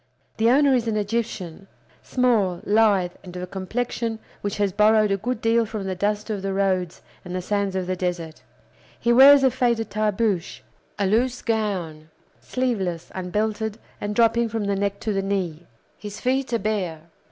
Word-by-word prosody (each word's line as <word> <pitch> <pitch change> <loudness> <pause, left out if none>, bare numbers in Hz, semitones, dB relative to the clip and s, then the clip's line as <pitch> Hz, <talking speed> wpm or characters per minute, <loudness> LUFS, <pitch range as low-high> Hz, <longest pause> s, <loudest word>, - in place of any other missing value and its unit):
The 225 +1 +3
owner 275 +2 +5
is 240 -3 +1
an 220 -1 0
Egyptian, 205 -4 -3 0.3
small, 220 -9 +1
lithe, 205 -4 +3
and 180 -1 -10
of 180 - -5
a - - -2
complexion 225 +5 -3 0.2
which 205 -1 -3
has 205 -2 +1
borrowed 215 +1 +4
a 195 - +2
good 240 +4 -3
deal 230 +1 +3
from 215 -2 -5
the 190 -1 -2
dust 210 +3 -1
of 205 -2 -3
the 195 0 -2
roads 185 -3 -1 0.2
and 180 0 -6
the 185 - -2
sands 200 -1 -1
of 185 -1 -1
the 185 +1 -2
desert. 175 -3 -4 0.6
He 235 0 +2
wears 275 +2 +8
a 265 - +5
faded 240 -3 0
tarbooshe, 210 - -1 0.4
a 200 - 0
loose 240 +5 +1
gown, 185 -9 -2 0.3
sleeveless, 195 -10 -2
unbelted, 210 +3 -2 0.2
and 205 0 -3
dropping 230 0 +3
from 220 -1 -2
the 200 0 0
neck 200 0 -1
to 215 - -1
the 195 - 0
knee. 180 -4 -3 0.3
His 205 -1 -7
feet 265 +1 0
are 235 - +2
bare. 195 -7 -2
205 Hz, 175 wpm, -23 LUFS, 185-230 Hz, 0.6 s, wears